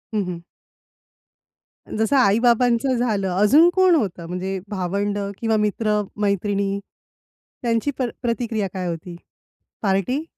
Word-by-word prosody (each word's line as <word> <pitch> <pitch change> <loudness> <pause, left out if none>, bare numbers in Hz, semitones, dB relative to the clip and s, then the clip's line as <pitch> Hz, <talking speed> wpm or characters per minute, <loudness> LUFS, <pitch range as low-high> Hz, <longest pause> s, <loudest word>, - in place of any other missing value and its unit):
हं, 210 - +1
हं. 180 -2 -5 1.6
जसं 220 +6 +1
आई-बाबांचं 240 +3 +3
झालं 215 -5 0
अजून 210 - +5
कोण 375 -2 +5
होतं 185 - -1
म्हणजे 185 +2 -3
भावंड 200 +1 -2 0.2
किंवा 225 -1 +1
मित्र-मैत्रिणी? 205 -2 0 0.8
त्यांची 230 +3 0
प - - 0 0.2
प्रतिक्रिया 230 -4 -1
काय 185 -2 -3
होती? 170 +1 -6 0.7
पार्टी? 200 - 0
210 Hz, 105 wpm, -22 LUFS, 195-235 Hz, 1.6 s, अजून